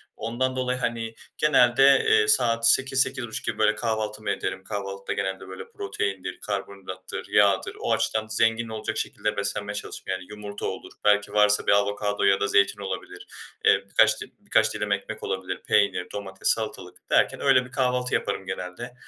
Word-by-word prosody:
Ondan 120 +4 -2
dolayı, 125 0 -1
hani, 115 -2 -2 0.2
genelde, 135 -1 +5
eee, 105 - +4
saat 115 0 +3
8.00-8.30 130 -3 0
gibi, 115 - -2
böyle, 105 0 +3
kahvaltımı 110 -2 -2
ederim. 95 0 -4
Kahvaltıda 100 -1 -4
genelde, 95 -1 -3
böyle, 95 0 -9
proteindir, 95 -1 -4
karbonhidrattır, 95 -2 -6
yağdır, 100 -2 +3
o - - -2
açıdan 110 0 0
zengin 115 +1 +1
olacak 110 -1 -4
şekilde 105 - -2
beslenmeye 100 +1 -3
çalışırım. 100 - -7
Yani 95 0 -4
yumurta 105 -1 -7
olur, - - -5
belki 105 0 +3
varsa 105 0 +3
bir - - +5
avokado 100 0 +1
ya 95 -1 +4
da 100 - +1
zeytin 100 0 +2
olabilir, 95 -1 -6 0.4
eee 100 0 +4
birkaç - - +4
dil - - -6
birkaç - - +2
dilim - - -3
ekmek - - -3
olabilir. 95 -1 -3
Peynir, 100 -3 +2
domates, 95 -2 -5
salatalık - - -2
derken - - +2
öyle 125 - +4
bir 125 - -14
kahvaltı 125 -1 0
yaparım 95 - -1
genelde. 95 +6 -6
105 Hz, 160 wpm, -25 LUFS, 100-115 Hz, 0.4 s, genelde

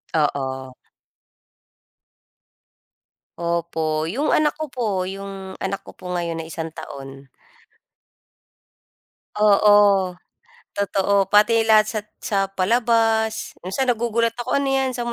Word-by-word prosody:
Oo. 130 -4 -1 2.6
Opo, 165 -2 -1
yung 260 - -1
anak 300 -1 +2
ko 310 +1 -4
po 245 -3 -2 0.2
yung 195 0 -7
anak 195 +1 -3
ko - - -12
po - - -11
ngayon 170 -1 -2
na 160 - -6
isang 160 0 -5
taon. 135 -3 -10 2.1
Oo, 205 -2 +4 0.6
totoo. 200 -1 +1
Pati 215 +2 +5
lahat 215 -1 +5
sa 215 0 -3 0.2
sa 215 -6 -2
palabas. 225 +2 +1
Minsan 195 +9 -2
nagugulat 230 0 0
ako, 240 +3 -1
"Ano 280 - -1
'yan, 265 -1 +1
saan 245 -1 -4
200 Hz, 105 wpm, -22 LUFS, 170-230 Hz, 2.6 s, Pati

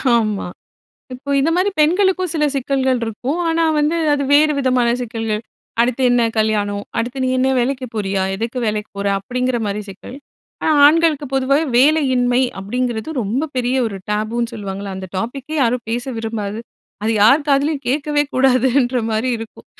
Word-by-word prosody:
ஆமா. 215 -5 0 0.7
இப்ப 280 +3 -3
இந்த 280 +4 +2
மாரி 370 +3 +2
பெண்களுக்கும் 370 +3 +2
சில 310 -2 0
சிக்கல்கள் 265 -1 0
இருக்கும். 250 +8 -3
ஆனா 330 0 +1 0.2
வந்து, 300 +3 +1 0.2
அது 285 -1 0
வேறு 300 +1 +5
விதமான 255 -3 +2
சிக்கல்கள். 225 -3 -3 0.4
"அடுத்து 245 +2 0
என்ன 245 0 +3 0.2
கல்யாணம், 205 -2 0
அடுத்து 245 +3 -2
நீ 260 - +1
என்ன 260 +1 +2
வேலைக்கு 255 +1 -1
போறியா? 195 -2 -1
எதுக்கு 230 +5 -4
வேலைக்கு 210 0 -2
போற?" 200 0 -1
அப்படிங்கிற 250 +4 -2
மாரி 205 +1 -2
சிக்கல். 195 +6 -10 0.5
ஆனா 315 - +2
ஆண்களுக்கு 310 -1 +3
பொதுவாவே 270 +3 +2
"வேலையின்மை" 260 -3 +3 0.2
அப்படிங்கிறது 240 +5 -3
ரொம்ப 240 +9 -1
பெரிய 250 +1 0
ஒரு 200 -3 -6
டேபுன்னு 225 +3 -1
சொல்லுவாங்கல்ல, 200 -2 -5
அந்த 190 0 -7
டாப்பிக்கே 265 +8 -4
யாரும் 240 -1 0
பேச 240 +1 -1
விரும்பாத, 220 -2 -4 0.4
அது 220 - +1
யார் 275 +7 +5
காதிலேயும் 285 +1 +1
கேட்கவே 290 +3 +1
கூடாதுன்ற 255 0 +2
மாரி 220 +4 0
இருக்கும். 225 -1 -10
250 Hz, 150 wpm, -19 LUFS, 220-280 Hz, 0.7 s, வேறு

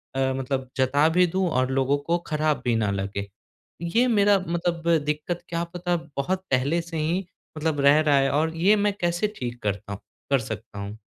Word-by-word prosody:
अ, 135 0 +1
मतलब 130 0 -3
जता 140 +4 +3
भी 180 +2 +4
दूँ 190 -1 +2
और 130 -3 +1
लोगों 135 +1 +2
को 165 +5 0
खराब 155 -1 0
भी 120 -2 +2
ना 110 -3 +1
लगे। 100 0 -3 0.5
ये 225 +9 +2
मेरा 205 -3 +4
मतलब 170 0 -2 0.2
दिक्कत 150 +3 -2
क्या 170 0 -1
पता 175 0 -1 0.2
बहुत 185 +7 -1
पहले 140 +6 +2
से 165 -1 -7
ही 170 +5 0 0.3
मतलब 155 -1 -1
रह 140 +2 +6
रहा 150 -2 +3
है 135 0 +2
और 160 +3 0
ये 195 +6 +5
मैं 205 0 +1
कैसे 175 +3 +1
ठीक 120 -1 -5
करता 100 -1 -3
हूँ 100 - -7 0.3
कर 135 - +5
सकता 110 -2 -7
हूँ? 100 +2 -6
150 Hz, 195 wpm, -25 LUFS, 130-170 Hz, 0.5 s, रह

